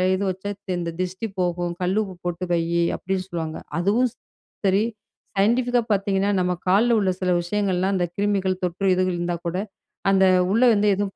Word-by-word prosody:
இது 190 - -2
வச்சா 190 +2 -5 0.3
இந்த 170 -1 -3
திஷ்டி 185 +4 -3
போகும், 175 -1 -1
கல்லுப்பு 190 +2 0
போட்டு 175 0 -3
வை 170 -1 +3 0.4
அப்படின்னு 190 0 -2
சொல்லுவாங்க. 160 -3 -4 0.2
அதுவும் 215 +8 +2 0.6
சரி, 195 +2 +3 0.5
சயின்டிஃபிக்கா 245 +4 +3
பார்த்தீங்கன்னா, 200 0 +1
நம்ம 180 0 +1
கால்ல 225 +5 +4
உள்ள 195 -2 +2
சில 180 -1 +1
விஷயங்கள் 195 +1 -1
எல்லாம் 190 +2 +1
அந்த 180 -2 +1
கிருமிகள் 195 -2 0
தொற்று 185 +2 +1
இதுகள் 185 0 +1
இருந்தா 175 0 -1
கூட, 170 +2 -2 0.5
அந்த 190 -1 +5 0.3
உள்ள 230 +5 +3
வந்து 210 0 +2
எதுவும் 195 0 -3
190 Hz, 160 wpm, -23 LUFS, 180-205 Hz, 0.6 s, அந்த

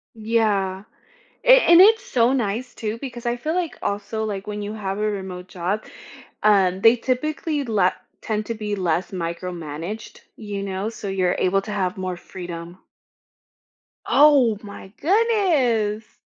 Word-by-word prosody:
Yeah. 215 -4 0 0.6
A - - -4
and 340 0 +7
it's 445 +4 +6
so 245 - +2
nice, 240 0 -2
too, 220 +1 -4
because 245 -3 -7
I 240 0 0
feel 310 +7 -3
like 355 -3 -2
also, 220 +2 -2
like, 200 -2 -4
when 210 0 -4
you 210 +1 -5
have 195 -1 -4
a - - -3
remote 185 -2 -6
job, 185 +4 -3 0.6
um, 190 -3 +3
they 225 +3 +6
typically 290 +4 -2
le 205 -6 +2 0.3
tend 215 -1 -3
to 230 - -3
be 210 -2 -3
less 180 -1 -1
micromanaged, 170 +2 -6 0.2
you 205 -3 -5
know, 195 +1 -3
so 225 -3 -7
you're 185 -2 0
able 195 +1 +2
to 210 - -6
have 185 -3 -1
more 185 -1 -4
freedom. 175 0 -8 1.3
Oh 275 -7 +5
my 200 -1 -10
goodness! 295 - +1
210 Hz, 145 wpm, -22 LUFS, 190-240 Hz, 1.3 s, and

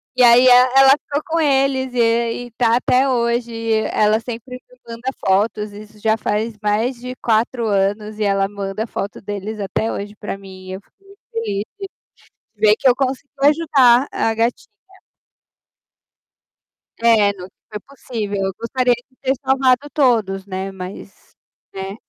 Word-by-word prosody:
e 255 - +4
aí 240 +1 +7
e - - +7
ela 255 +2 +6
ficou 285 +1 0
com 330 +1 -1
eles, 270 -3 +1
e 245 - -2
aí, 235 +1 0
está 230 0 +1
até 255 +2 +2
hoje, 235 -1 0
e 225 0 -3 0.2
ela 215 +1 +2
sempre 240 +2 -8
me - - -22
manda 235 +3 -5 0.2
fotos, 210 +2 +1
isso 210 +1 -13
já 220 +1 +2
faz 215 +1 -2
mais 220 +5 0
de 250 +1 -7
4 230 +1 0
anos 205 +2 -1
e 215 - -2
ela 195 -1 +1
manda 200 +2 -5
foto 200 - -5
deles 205 +2 -6
até 200 +3 -2
hoje 205 +1 -6
para 205 -2 -6
mim, 190 -1 -12
e - - -5
eu 190 - -7
fico - - -38
muito 395 +1 -20
feliz 210 -3 -2
de 410 - -33 0.7
de 210 - -31
ver 215 0 +5
que 270 - +2
eu 245 - +5
consigui 270 +1 -3
ajudar 285 -4 +4
a 225 - 0
gatinha. 230 +2 -2 2.3
É, 220 -3 +4
não 185 -1 -10 0.2
foi 210 - -5
possível, 220 -5 -6
eu 190 - -1
gostaria 250 +1 +1
de 245 +2 -11
ter 265 0 +1
salvado 265 +1 +2
todos, 220 -9 +1
né, 190 0 -5
mas, 190 +1 -10 0.4
né. 195 +1 -6
230 Hz, 165 wpm, -19 LUFS, 205-255 Hz, 2.3 s, aí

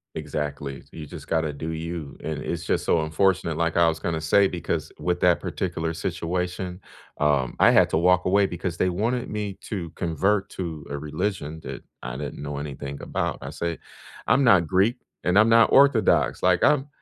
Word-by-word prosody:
Exactly, 75 -2 -4
so - - -23
you 80 -2 -7
just - - -10
gotta 80 -2 0
do 80 +3 -5
you, 80 -2 -5
and 80 -1 -3
it's 85 -1 -4
just - - 0
so 80 - +3
unfortunate, 85 +1 +1
like 85 -1 0
I 85 -1 +5
was 80 -1 -1
gonna 80 0 -2
say, 95 +5 +4
because 90 -2 -3
with 90 +3 -1
that 90 -1 +4
particular 85 -3 -3
situation, 90 +2 -3 0.4
um, 70 -4 +2
I - - +7
had - - +5
to - - +2
walk 90 +2 +3
away 100 +2 +3
because 85 -1 -4
they 90 - +2
wanted 115 +7 -1
me 105 -2 -4
to 90 -6 -4
convert 95 +5 0
to 80 -5 -6
a 70 - -3
religion 75 +1 -3
that - - -7 0.2
I - - -5
didn't 70 +1 -6
know 70 0 -4
anything 70 -1 -6
about. - - -2
I - - -5
said, 85 -1 -4 0.5
"I'm 140 - +4
not 95 -9 +5
Greek, 95 - +2 0.3
and 90 +3 +3
I'm 110 +2 +5
not 115 0 +5
Orthodox. 110 - +4
Like, 90 -1 +3
I'm 145 -1 +3
85 Hz, 190 wpm, -25 LUFS, 75-95 Hz, 0.5 s, I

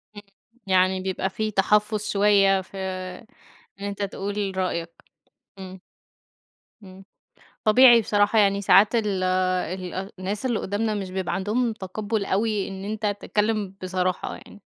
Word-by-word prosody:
امم، 205 - -9 0.5
يعني 185 0 +2
بيبقى 190 0 -2
في 215 +3 -3
تحفظ 210 +2 +2
شوية، 200 -1 +4
في 190 +1 -13 1.0
إن 200 - -6
أنت 200 0 -5
تقول 200 0 -3
رأيك. 170 -2 -2 0.7
إمم، 190 -1 -9 1.0
إمم. 190 0 -13 0.6
طبيعي 240 +2 +7
بصراحة، 205 0 +2
يعني 200 -1 +3
ساعات 200 +4 +5
ال 210 -5 0 1.0
الناس 200 +6 -3
اللي 235 -4 0
قدامنا 215 +2 -2
مش 195 -3 -4
بيبقى 190 -1 -3
عندهم 220 +5 0
تقبل 205 +1 -4
أوي 210 0 0
إن 195 0 -7
أنت 215 +1 -3
تتكلم 210 -2 -1
بصراحة 185 -1 -2
يعني. - - -15
200 Hz, 125 wpm, -24 LUFS, 190-215 Hz, 1.0 s, طبيعي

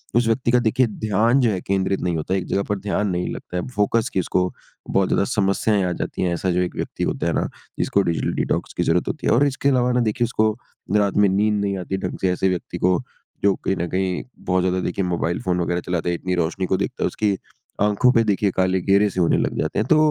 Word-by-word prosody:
उस 120 -1 +3
व्यक्ति 120 +1 +1
का 125 - +5
देखिए 125 +3 +3
ध्यान 110 +4 +1
जो 120 - +3
है 95 - -2
केंद्रित 95 0 0
नहीं 90 -2 0
होता 80 +4 -2
है 95 - +2
एक - - -6
जगह 100 - 0
पर 105 - 0
ध्यान 105 +1 -1
नहीं 90 -1 -1
लगता 90 - -6
है। 90 - -3
फ़ोकस 105 +2 +1
की - - +1
इसको 90 +1 0 0.4
बहुत 95 -1 +2
ज़्यादा - - +2
समस्याएँ 100 -1 +1
आ - - -2
जाती - - -4
हैं 90 -1 +1
ऐसा 90 +2 -1
जो 90 +1 +1
एक 90 - -2
व्यक्ति - - -4
होता - - -1
है - - +1
ना, - - 0 0.3
जिसको 100 - +2
डिजिटल 85 -4 -1
डिटॉक्स - - -1
की - - +2
ज़रूरत - - +1
होती - - -3
है - - +4
और 135 +5 +4
इसके 140 0 0
अलावा 125 -2 +2
ना 125 - +2
देखिए 120 +2 0
उसको 110 -2 +1 0.5
रात 100 -1 +1
में 105 0 +5
नींद 105 +2 +2
नहीं 100 -1 -1
आती 95 +1 -3
ढंग - - -4
से 95 - +2
ऐसे 95 +1 +1
व्यक्ति 90 -2 -3
को, 90 -1 +2 0.4
जो 100 -1 +5
कहीं 95 - -2
न 85 - -2
कहीं 95 0 -1 0.2
बहुत 90 0 +1
ज़्यादा 95 0 +1
देखिए 95 +1 -1
मोबाइल 85 -1 -1
फ़ोन 90 -1 0
वग़ैरह 85 +1 -1
चलाते 90 -1 -1
है 85 - 0
इतनी 90 +1 -2
रोशनी 90 +2 -1
को 95 - +1
देखता 100 - -3
है - - +3
उसकी 100 -3 0 0.4
आँखों 105 +5 +4
पे 115 -2 +4
देखिए 100 -1 +1
काले 95 0 +2
घेरे 100 +2 +3
से 95 - -4
होने 85 - +3
लग - - -1
जाते 80 - -1
हैं 110 - +1
तो 155 - +5
95 Hz, 255 wpm, -22 LUFS, 90-105 Hz, 0.5 s, का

